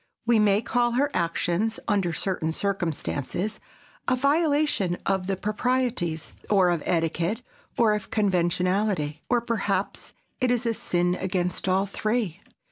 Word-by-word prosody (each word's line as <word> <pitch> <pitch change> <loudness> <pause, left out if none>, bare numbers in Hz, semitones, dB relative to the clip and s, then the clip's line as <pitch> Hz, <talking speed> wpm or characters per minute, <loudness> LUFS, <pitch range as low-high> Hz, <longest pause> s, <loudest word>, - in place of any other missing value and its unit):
We 235 -1 +4
may 210 0 +3
call 240 0 +1
her 280 +4 +2
actions, 175 +5 0
under 195 -5 +1
certain 165 -2 -1
circumstances, 185 +1 -2 0.5
a 255 - +3
violation 285 - +2
of 190 -1 0
the 195 - 0
proprieties, 210 -5 -1 0.2
or 190 -4 +4
of 170 -3 0
etiquette, 170 +6 0 0.3
or 225 -2 +4
of 210 -1 -3
conventionality. 180 -4 +1
Or, 245 -1 +3
perhaps, 205 -4 -2 0.3
it 255 - +2
is 245 0 +1
a 230 - +2
sin 175 -4 0
against 180 0 -2
all 190 +2 +3
three. 210 -2 -1
195 Hz, 130 wpm, -26 LUFS, 175-230 Hz, 0.5 s, We